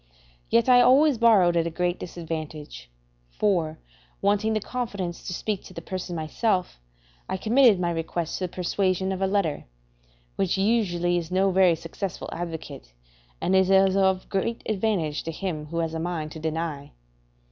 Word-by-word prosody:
Yet 230 +1 +3
I 250 -1 +7
always 270 0 +5
borrowed 200 -7 +5
at 170 0 +1
great 180 0 0
disadvantage; 155 - -7 0.4
for, 165 - 0 0.4
wanting 205 +2 +1
the 215 - +1
confidence 200 -7 -4
to - - -3
speak 200 +2 -3
to - - -13
the - - -6
person 185 -2 -5
myself, 180 - -1 0.5
I 190 - -1
committed 230 0 +4
my 175 -1 0
request 165 0 -3
to 185 - -1
the 175 - -7
persuasion 185 +1 0
of 190 0 -3
a 190 - +2
letter, 190 -7 0 0.7
which 195 -1 +1
usually 185 -5 +1
is 165 -1 -7
no 190 +1 +2
very 185 -2 +4
successful 165 +3 -6
advocate, 160 - -7 0.5
and 190 - +1
is 190 0 +4
of 190 -1 +4
very 195 +4 -1
great - - -23
advantage 195 -8 -1
to 165 - -5
him 160 -3 -4
who 165 +2 -5
has 165 -1 -1
a 160 - -3
mind 160 -2 -3
to 160 - -8
deny. 160 -2 -4
180 Hz, 165 wpm, -25 LUFS, 165-200 Hz, 0.7 s, I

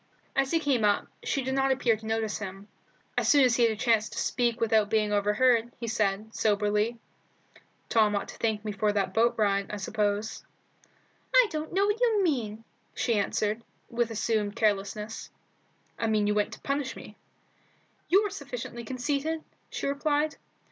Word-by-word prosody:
As 275 -1 +2
he 330 - +2
came 275 -7 +1
up, 205 -1 +3 0.2
she 275 - -1
did 265 +1 -2
not 270 0 +2
appear 250 -4 +2
to 220 +1 -10
notice 220 -1 -1
him. 195 0 -7 0.5
As - - +1
soon 285 -2 +6
as 245 -2 +3
he 240 - +5
had 230 - +3
a - - -2
chance 220 -1 +2
to - - -10
speak 240 -2 0
without 220 -2 +3
being 210 -1 +1
overheard, 225 +3 +3
he 235 - -4
said, 215 -1 -1
soberly 210 +2 +1 0.9
"Tom 215 -3 +3
ought 200 - -2
to - - -10
thank 220 -2 -1
me 210 - -2
for 210 +1 +1
that 195 -2 -1
boat 230 +3 +3
ride, 200 -2 +1
I 210 - -4
suppose." 205 +1 -2 0.9
"I - - +8
don't 310 -1 -4
know 390 +2 +2
what 415 +3 0
you 445 -5 +3
mean," 225 - -1 0.3
she 235 - +1
answered, 210 +1 0 0.3
with 235 -1 0
assumed 215 -2 -1
carelessness. 210 +1 -1 0.7
"I 225 - 0
mean 215 -1 +2
that - - +1
you - - +2
went 210 0 0
to - - -11
punish 275 -1 -2
me." - - -11 0.9
"You're 400 +3 +4
sufficiently 240 - -6
conceited," 285 +6 -2 0.3
she - - -4
replied. 295 +2 0
225 Hz, 175 wpm, -28 LUFS, 210-265 Hz, 0.9 s, I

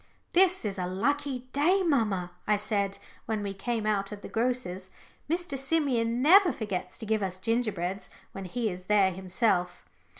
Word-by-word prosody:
"This 370 -4 +4
is 200 -2 -3
a 180 - -1
lucky 255 +6 -1
day, 355 +7 +3
mamma," 210 - +1 0.2
I 210 0 +3
said, 200 -1 -1 0.3
when 215 -2 -1
we 200 -1 -3
came 220 +3 -2
out 200 -2 0
of 205 -1 -8
the - - -7
grocer's. 225 -6 -2 0.4
"Mr. 340 -3 -1
Simeon 260 -4 0
never 365 +4 +7
forgets 190 -4 -4
to - - -7
give 220 0 +1
us 185 -2 -2
gingerbreads 195 -4 -1 0.2
when 195 -1 -7
he 220 +3 -2
is 180 0 -8
there 200 -1 +4
himself." 185 0 -1
215 Hz, 165 wpm, -28 LUFS, 190-255 Hz, 0.4 s, never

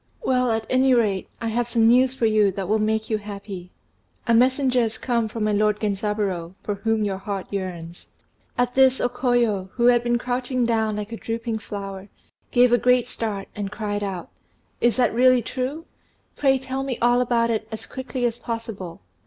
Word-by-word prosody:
"Well, 255 - +2
at 225 0 -1
any 255 0 +4
rate, 205 -5 +1
I 230 - -2
have 235 +1 0
some 230 -1 +2
news 250 +3 +5
for 240 - 0
you 215 -2 +4
that 190 -1 -4
will 215 +2 +2
make 220 +1 0
you 215 - +1
happy. 200 -3 -8 0.6
A 235 - +2
messenger 255 +1 +3
has 225 -1 -1
come 235 -2 0
from 220 0 -4
my 215 - +1
lord 210 0 +2
Genzaburô, 200 -4 -2
for 205 - -2
whom 220 +2 0
your 195 -2 -2
heart 195 -1 -4
yearns." 175 -4 -5 0.5
At 245 0 +1
this 265 -1 +5
O - - +2
Koyo, 235 -7 0
who 240 - +1
had 240 -1 +5
been 240 0 +2
crouching 250 0 -1
down 220 -2 +1
like 210 +1 -5
a 230 - -5
drooping 230 0 -3
flower, 200 -1 -7 0.4
gave 245 0 +4
a 245 - +5
great 250 -1 +3
start, 210 -5 -4
and 205 -1 -4
cried 205 -1 -3
out, 190 -4 -5 0.5
"Is 240 -1 +3
that 245 -4 +2
really 250 0 +4
true? 270 +8 -4 0.5
Pray 270 -2 +3
tell 265 +1 -4
me 270 -3 -3
all 240 +1 +3
about 235 -1 +2
it 220 -1 -2
as 220 - -6
quickly 260 -1 -4
as 235 0 -1
possible." 225 - -6
225 Hz, 195 wpm, -23 LUFS, 205-245 Hz, 0.6 s, news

